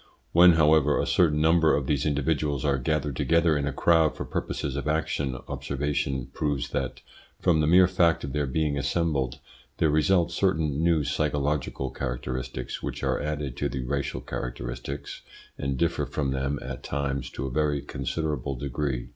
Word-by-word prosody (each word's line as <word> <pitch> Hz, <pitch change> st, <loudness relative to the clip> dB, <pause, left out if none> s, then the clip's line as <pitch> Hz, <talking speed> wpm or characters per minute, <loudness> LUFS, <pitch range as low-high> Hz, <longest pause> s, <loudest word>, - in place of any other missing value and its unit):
When, 90 Hz, +1 st, +8 dB
however, 75 Hz, -2 st, +4 dB
a -, -, +1 dB
certain 75 Hz, -4 st, +3 dB
number 80 Hz, 0 st, +4 dB
of 70 Hz, -, -1 dB
these 70 Hz, +1 st, 0 dB
individuals 75 Hz, -1 st, 0 dB
are 70 Hz, -2 st, +2 dB
gathered 75 Hz, +1 st, -1 dB
together 85 Hz, +2 st, +3 dB
in 70 Hz, -1 st, -1 dB
a -, -, 0 dB
crowd 80 Hz, +2 st, +3 dB
for -, -, -5 dB
purposes 70 Hz, -3 st, -3 dB
of 70 Hz, +1 st, -3 dB
action, 75 Hz, -4 st, -1 dB
observation 70 Hz, -2 st, -2 dB
proves 70 Hz, -4 st, -1 dB
that, -, -, -3 dB, 0.4 s
from 80 Hz, -3 st, +3 dB
the 75 Hz, -, +2 dB
mere 90 Hz, +3 st, +7 dB
fact 85 Hz, -2 st, +2 dB
of 70 Hz, -2 st, -5 dB
their 75 Hz, -1 st, 0 dB
being 75 Hz, +1 st, 0 dB
assembled, 70 Hz, -3 st, 0 dB, 0.4 s
there 80 Hz, -, +2 dB
result 85 Hz, +3 st, +3 dB
certain 80 Hz, -5 st, +1 dB
new 85 Hz, -3 st, +3 dB
psychological 75 Hz, -2 st, -1 dB
characteristics, 65 Hz, 0 st, -4 dB
which -, -, -5 dB
are -, -, +1 dB
added 75 Hz, -4 st, -3 dB
to -, -, -1 dB
the 65 Hz, -, -4 dB
racial 70 Hz, -1 st, -2 dB
characteristics 60 Hz, +2 st, -6 dB, 0.3 s
and 70 Hz, -1 st, -2 dB
differ 85 Hz, +3 st, 0 dB
from 70 Hz, -3 st, -2 dB
them 70 Hz, +2 st, -1 dB
at 65 Hz, 0 st, -6 dB
times 70 Hz, -2 st, -2 dB
to -, -, -5 dB
a 65 Hz, -, -4 dB
very 75 Hz, +1 st, +1 dB
considerable 75 Hz, -3 st, -3 dB
degree. 70 Hz, -1 st, -3 dB
75 Hz, 165 wpm, -26 LUFS, 65-80 Hz, 0.4 s, When